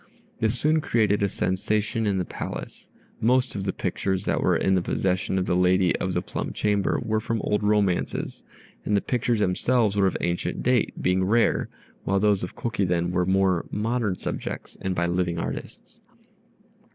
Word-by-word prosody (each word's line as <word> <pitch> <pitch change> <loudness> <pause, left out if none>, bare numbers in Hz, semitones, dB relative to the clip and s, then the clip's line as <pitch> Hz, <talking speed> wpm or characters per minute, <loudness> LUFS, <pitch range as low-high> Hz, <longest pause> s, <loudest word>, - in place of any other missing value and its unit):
This 110 +2 +1
soon 155 +1 +3
created 105 -7 +2
a 100 - +2
sensation 105 +4 -1
in 100 -2 +1
the 90 - -1
Palace. - - -7 0.3
Most 125 +2 +2
of 95 -1 -3
the 95 - 0
pictures 95 0 -2
that - - 0
were - - +3
in 95 - +2
the 95 - +3
possession 95 +1 0
of 90 - +1
the 90 - +1
lady 90 0 +3
of - - -2
the - - 0
plum - - -4
chamber 105 -2 +1
were 110 0 +1
from 115 +1 -2
old 105 +1 0
romances, 105 -3 0 0.4
and 105 - +1
the - - +1
pictures 120 -1 0
themselves 105 +3 +2
were 100 -1 +3
of 95 - -1
ancient 85 0 -2
date, 125 -3 +1
being 90 +1 +2
rare, 115 +5 +2 0.3
while 100 0 +1
those 105 -2 +2
of 90 - -6
Kokiden 90 -6 0
were 90 0 +1
more 95 -2 +2
modern 110 -2 -1
subjects - - -5
and 95 -1 -2
by 85 - +1
living 85 0 0
artists. - - -6
100 Hz, 175 wpm, -25 LUFS, 90-110 Hz, 0.4 s, soon